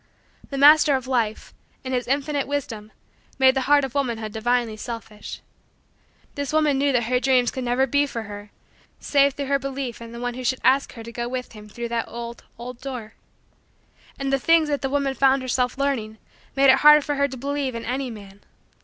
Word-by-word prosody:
The 275 - -5
Master 295 +1 +7
of 260 -1 -3
Life, 235 -5 -2 0.3
in 260 -1 -4
His 250 -1 -1
infinite 280 +1 -1
wisdom, 230 -7 -4 0.5
made 265 -1 +5
the 265 0 -1
heart 290 -1 +5
of 260 - -8
womanhood 235 -6 -2
divinely 235 +1 0
selfish. 220 -1 -8 0.9
This 285 -1 -4
woman 305 -3 +2
knew 280 0 +2
that 245 -2 +2
her 250 +2 +1
dreams 255 -2 +2
could 260 - -5
never 245 +2 +2
be 285 +2 +1
for 230 -4 -5
her 205 0 -9 0.5
save 280 -1 +3
through 285 - -3
her 275 0 +1
belief 270 -4 -5
in 230 0 -9
the 235 - -8
one 245 0 -3
who 255 +1 -7
should 260 +1 0
ask 270 +2 +3
her 230 - -9
to 230 - -9
go 235 +1 -4
with 250 0 -5
him 210 -1 -12
through 235 +3 -6
that 230 -1 -2
old, 235 0 -8
old, 245 +1 -9
door. 250 -5 -7 1.0
And 275 0 -2
the 275 - +2
things 325 +3 +3
that 285 -1 -1
the 270 - -1
woman 280 -1 0
found 270 0 +3
herself 250 0 -1
learning 250 -6 -2 0.4
made 275 -1 +6
it 265 - +3
hard 300 0 +7
for 295 - -1
her 280 0 +1
to 265 -1 -8
believe 280 -1 -3
in 230 - -5
any 255 +2 -2
man. 200 -3 -11
260 Hz, 205 wpm, -23 LUFS, 235-275 Hz, 1.0 s, Master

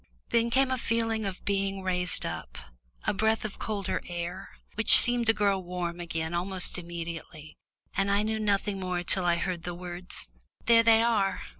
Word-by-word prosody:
Then 235 0 +2
came 265 +2 +2
a 260 - 0
feeling 225 -2 0
of 190 -2 -5
being 195 -1 -1
raised 180 -1 +1
up, - - -6 0.5
a - - +1
breath 220 +2 +1
of 210 - -6
colder 205 -3 -2
air, 175 0 -5 0.2
which 225 - +7
seemed 240 -1 +2
to - - +8
grow 200 -2 +1
warm 175 -1 -4
again 165 -1 -3
almost 185 +1 0
immediately, 170 -2 -7 0.4
and 195 0 +1
I 200 +1 +2
knew 220 0 -1
nothing 205 -1 0
more 180 -1 -2
till 185 +1 +1
I 175 -1 +3
heard 170 0 -2
the 175 0 -5
words, 175 - -5 0.3
"Here 230 -1 +6
they 225 0 +5
are." 210 -5 +1
195 Hz, 175 wpm, -28 LUFS, 175-220 Hz, 0.5 s, to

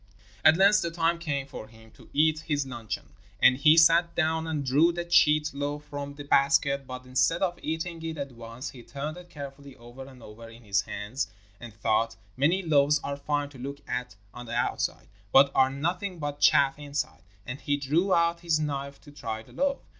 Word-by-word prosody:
At 155 +1 +7
length 200 +2 +5
the 170 - -1
time 165 0 0
came 145 -5 -2
for 135 -5 -9
him 110 0 -18
to - - -18
eat 155 +1 +3
his 145 -3 -1
luncheon, 115 -5 -6 0.3
and 130 - +6
he 155 +4 +5
sat 170 +1 +5
down 160 0 0
and 150 -3 -2
drew 145 +7 +4
the 175 0 -4
cheat 150 -3 +4
loaf 145 +1 -3
from 145 -1 -6
the 145 - -8
basket. 140 -1 +2
But 130 0 -8
instead 130 +8 +1
of 175 -2 -1
eating 165 +1 -4
it 160 -1 -4
at 140 -1 -5
once 115 +3 -8
he 125 - -12
turned 150 +6 -6
it 180 0 -12
carefully 140 -3 -9
over 120 +3 -12
and 130 -3 -14
over 115 +2 -11
in 115 +1 -15
his 100 -2 +1
hands, 105 +7 -4 0.3
and 120 - -9
thought: 110 +1 0 0.2
'Many 165 +9 +2
loaves 150 -2 +3
are 140 - -3
fine 145 0 -2
to 135 -3 -14
look 140 +3 -7
at 125 -3 -4 0.2
on 120 0 -9
the 120 - -4
outside, 120 - -1 0.2
but 140 +3 +6
are 130 0 +4
nothing 175 +7 -3
but 145 -2 -4
chaff 140 +1 +4
inside,' 140 - -4 0.2
and 125 +3 -6
he 145 -1 0
drew 155 +8 0
out 170 -1 +3
his 170 -2 +1
knife 140 -2 -4
to 145 - -15
try 110 -6 -5
the - - -19
loaf. 280 0 0
145 Hz, 205 wpm, -27 LUFS, 130-160 Hz, 0.3 s, At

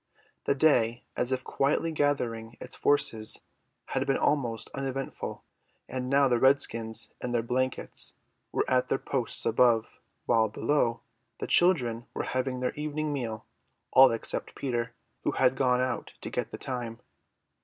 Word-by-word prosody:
The 140 - +2
day, 120 -5 +3
as 125 - -1
if 130 0 -1
quietly 150 +4 0
gathering 120 -7 -1
its - - -7
forces, 110 -6 +2 0.5
had 135 +1 -1
been 135 - +2
almost 125 -6 0
uneventful, 135 -1 -4 0.4
and 130 -1 -4
now 140 0 +5
the 120 -2 +2
redskins 115 -4 +2
in 125 - -3
their 115 -1 +1
blankets 130 +2 -1 0.4
were - - 0
at 130 -1 +2
their - - +1
posts 130 -4 -2
above, 115 -1 +3 0.3
while, 110 -2 +3
below, 120 +1 0 0.4
the - - -2
children 125 -10 +3
were - - -1
having 130 0 -2
their 125 - 0
evening 150 0 -2
meal; 115 -6 -4 0.5
all 135 0 +8
except 115 - -2
Peter, 120 -3 -2 0.3
who - - 0
had 130 0 +3
gone 125 -2 +2
out 130 0 -3
to - - -6
get - - -2
the - - -7
time. 120 -3 -4
125 Hz, 150 wpm, -29 LUFS, 115-135 Hz, 0.5 s, all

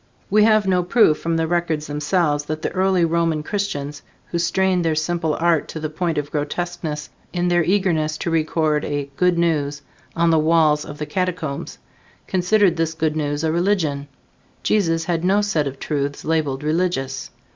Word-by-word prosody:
We 210 +1 +5
have 215 -2 +4
no 180 -1 +3
proof 175 -3 +3
from 165 0 -1
the 165 - +1
records 165 -2 -1
themselves 150 0 0
that 155 +1 -4
the - - -1
early 185 -2 +2
Roman 165 -2 0
Christians, 150 -7 -3 0.3
who 170 - 0
strained 185 +1 +1
their 160 -1 +1
simple 160 0 0
art 165 -2 +1
to 160 - -6
the 155 -1 -4
point 165 0 -2
of 145 0 -3
grotesqueness 155 0 -3 0.2
in 175 0 0
their 175 -1 +3
eagerness 165 -4 +1
to 170 - -3
record 155 -1 +1
a 145 -1 -3
"good 180 +2 +2
news" 150 -4 0 0.3
on 170 0 +3
the 160 - +4
walls 155 -1 +3
of 150 - -8
the 150 - -4
catacombs, 170 -2 -3 0.5
considered 185 -1 +2
this 160 -1 -1
good 160 -1 0
news 145 0 -2
a 160 - +1
religion. 165 -5 0 0.6
Jesus 165 -6 +1
had 165 0 -1
no 195 +3 +3
set 165 -8 0
of 135 0 -6
truths 145 -1 -3
labeled 150 -4 0
Religious. 155 -4 -1
165 Hz, 175 wpm, -21 LUFS, 150-175 Hz, 0.6 s, We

